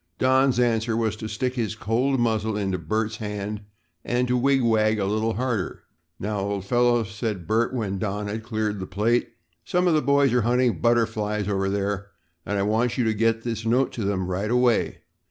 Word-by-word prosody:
Don's 130 -1 +3
answer 115 -2 +1
was 110 -2 0
to 110 - -5
stick 125 +4 -2
his 115 -4 -2
cold 120 +5 0
muzzle 110 -2 0
into 95 -3 -1
Bert's 110 +7 -2
hand 105 0 -4 0.4
and 125 +1 0
to 125 - +1
wig 135 +1 +2
wag 110 -1 +3
a 100 - 0
little 110 +3 0
harder. 120 -5 -2 0.4
"Now, 105 +1 -2
old 100 -1 -3
fellow," 120 +1 +3
said 105 -3 -4
Bert 115 +6 +1
when 105 -6 -2
Don 105 +1 -2
had 105 +2 -4
cleared 110 -2 -2
the 95 - -5
plate, 110 +6 +1 0.3
"some 180 -1 +1
of 170 - +4
the 155 - +3
boys 140 -2 +3
are 125 - +3
hunting 120 -5 +1
butterflies 110 -3 +1
over 95 -1 0
there 100 0 -2 0.4
and 105 - -1
I 100 - +1
want 110 +4 +1
you 125 - +2
to 110 -1 +1
get 115 +1 +1
this 115 -2 -3
note 125 +4 +2
to 115 - -4
them 100 -2 -1
right 95 +4 -2
away. 125 -1 +1
110 Hz, 195 wpm, -24 LUFS, 105-120 Hz, 0.4 s, of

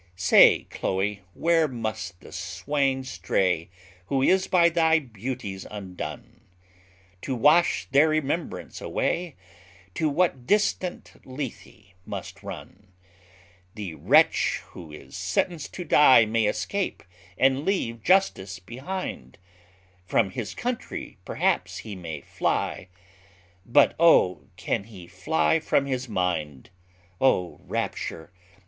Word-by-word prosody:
Say, 95 +1 +6
Chloe, 100 +2 -2
where 165 -1 +3
must 110 -7 -5
the - - -13
swain 135 -2 -1
stray 90 -9 -1 0.4
Who 135 -1 +1
is 190 +5 +3
by 175 -3 +5
thy 160 -1 +3
beauties 120 -6 -6
undone? 95 -4 -8 0.8
To 135 - -3
wash 150 +8 +3
their 145 +3 +5
remembrance 155 +2 -2
away, 175 -4 -2 0.6
To 155 - 0
what 145 -5 0
distant 205 -3 -1
Lethe 130 -7 -8
must - - -7
run? 100 +2 -10 0.9
The 100 -6 -6
wretch - - +3
who 85 -4 -11
is 70 -3 -12
sentenced 150 - -2
to 180 - -4
die 140 -7 +6
May 110 0 +1
escape, 200 - -2 0.3
and 135 +1 +3
leave 120 - -1
justice 135 - +2
behind; 120 - -6 0.7
From 95 -1 +2
his 105 -1 -5
country 245 -1 -5
perhaps - - 0
he 110 -3 -7
may 85 -4 -7
fly, - - -2 0.8
But 140 +4 +4
oh! 90 - +4
can 100 - -2
he 100 -6 -12
fly 85 - +1
from 140 -3 +1
his 130 -2 -3
mind? 85 - -2 0.5
O 90 -10 +1
rapture! 80 +1 -4
120 Hz, 115 wpm, -25 LUFS, 95-155 Hz, 0.9 s, Say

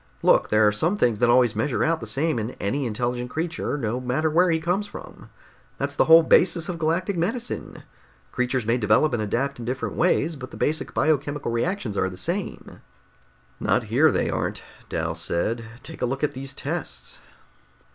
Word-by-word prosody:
"Look, - - +4
there 105 0 +4
are - - +4
some 165 - 0
things 120 - +2
that 120 - +3
always 120 -2 +4
measure 115 +5 0
out 165 0 +1
the 115 - -7
same 140 +4 0
in 110 +3 -4
any 130 +7 -1
intelligent 120 +2 -2
creature 160 +1 -3
no 120 -2 -2
matter 145 +6 0
where 175 +3 +4
he 165 -1 +2
comes 180 +5 -1
from. - - -11 0.5
That's - - -3
the - - +3
whole 165 +1 +8
basis 170 0 +3
of 175 -3 -4
galactic 170 +5 0
medicine. 225 +9 -3 0.5
Creatures 125 -1 -1
may 115 +3 +1
develop 110 +8 +3
and 120 - 0
adapt 125 +6 -1
in 120 - -6
different 125 +2 -3
ways, 165 -2 +2
but 130 -2 -8
the - - -11
basic 155 +2 -2
biochemical 145 -4 0
reactions 120 - -2
are 95 - +1
the 90 - -10
same." 175 - -4 0.8
"Not - - +1
here, - - +6
they - - 0
aren't," - - -2 0.3
Dal - - -2
said. 115 +7 -1 0.2
"Take 160 - -10
a 125 - +1
look 135 +3 -3
at 150 - +1
these 135 +1 -6
tests!" - - -5
135 Hz, 185 wpm, -24 LUFS, 120-165 Hz, 0.8 s, whole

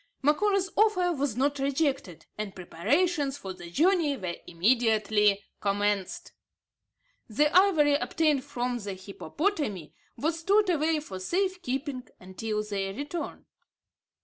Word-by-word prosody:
Macora's 380 +6 +2
offer 370 -5 +3
was 280 -6 -1
not 285 +2 +1
rejected; 275 - -1
and 210 -2 -5
preparations 280 - 0
for 190 -8 -7
the 175 -1 -10
journey 315 - +2
were 185 -6 -4
immediately 210 0 +2 0.2
commenced. 205 -1 -1 1.0
The 295 +8 +2
ivory 345 -7 +5
obtained 295 -1 +1
from 245 -3 -3
the 200 -3 -5
hippopotami 205 - -3 0.2
was 320 +2 -1
stored 400 +3 +3
away 315 -1 +1
for 190 -11 -8
safe 370 - -1
keeping 265 -2 -4
until 210 +3 -4
their 195 -2 -3
return. 290 +6 -5
275 Hz, 120 wpm, -28 LUFS, 205-325 Hz, 1.0 s, ivory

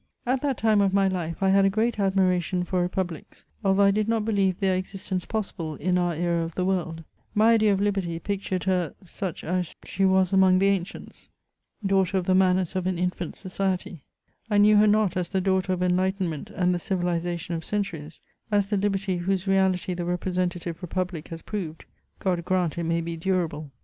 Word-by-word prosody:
At 255 +1 +1
that 275 -4 0
time 215 -2 +3
of 195 -1 +2
my 195 -1 +4
life 175 -1 -3
I 190 - +4
had 195 +1 +5
a 195 - +4
great 220 +3 0
admiration 185 -2 +1
for 180 0 -1
republics, 175 -2 -4 0.2
although 195 0 +3
I 200 - +6
did 215 +2 0
not 225 -2 +1
believe 195 -4 +1
their 190 -2 +2
existence 185 -1 -4
possible 190 -8 -3
in 180 +4 0
our 175 -2 +1
era 170 0 0
of 165 0 -6
the 180 - 0
world; 165 -4 -1 0.3
my 220 +2 +5
idea 215 -2 +4
of 195 - +1
liberty 195 -5 -1
pictured 190 0 -3
her 180 -4 0
such 185 0 -5
us 180 0 -2
she 195 - -2
was 190 -1 +3
among 190 -1 +5
the 195 +1 +3
ancients, 195 -1 -4 0.6
daughter 195 -1 +2
of 180 - -1
the 185 - +2
manners 185 -1 +2
of 185 -1 -1
an 185 -2 -1
infant 180 -1 -2
society; 185 -4 -3 0.5
I 205 - +2
knew 210 +1 +6
her 210 +1 +6
not 210 -3 +3
as 180 -1 -1
the 190 - 0
daughter 190 0 +1
of 180 0 0
enlightenment 180 -3 0
and 180 -1 +1
the 175 - -1
civilisa 175 -2 -1
tion 170 +1 -6
of 165 -1 -3
centuries 175 -7 -4
— - - -40
as 205 0 +1
the 205 - +2
liberty 195 -2 0
whose 190 +2 -1
reality 190 -2 +1
the 175 0 -3
representative 175 -1 -2
republic 180 -2 -3
has 165 -1 -8
proved: 170 -7 -5 0.3
God 180 -3 -1
grant 180 -3 0
it 170 - -2
may 165 +1 0
be 165 0 -5
durable 165 -4 -1
185 Hz, 200 wpm, -25 LUFS, 175-195 Hz, 0.6 s, I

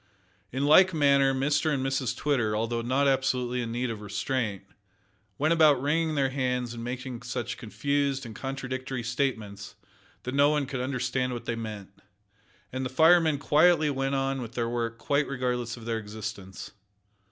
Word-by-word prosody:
In 135 +3 -1
like 180 +4 +6
manner 140 -2 +4
Mr 145 +4 +1
and 135 -2 -1
Mrs 135 -2 -1
Twitter, 120 -8 0
although 115 +2 -1
not 130 +4 +1
absolutely 125 -2 +1
in 115 -1 -4
need 120 +1 -2
of 110 -2 -6
restraint, 105 0 -2 0.7
went 155 +3 +2
about 155 -5 +5
wringing 155 +3 0
their 135 -2 +1
hands 125 -3 -1
and 115 -1 -7
making 125 0 -5
such 120 0 -4
confused 140 +3 -1
and 110 -2 -9
contradictory 130 -1 -4
statements 115 -5 -3 0.5
that 125 - -4
no 140 +1 +5
one 150 -2 +1
could 130 -2 -4
understand 125 -1 -1
what 120 -1 -6
they 115 - -2
meant, 105 -4 -7 0.8
and 130 0 -2
the 130 - -2
firemen 160 +2 +5
quietly 155 +2 +4
went 135 0 -1
on 135 0 -1
with 115 -1 -7
their 120 -1 -1
work 115 -1 -2
quite 140 +2 0
regardless 125 -2 -2
of 115 - -11
their 115 -1 -1
existence. 105 -3 -7
130 Hz, 165 wpm, -27 LUFS, 115-140 Hz, 0.8 s, like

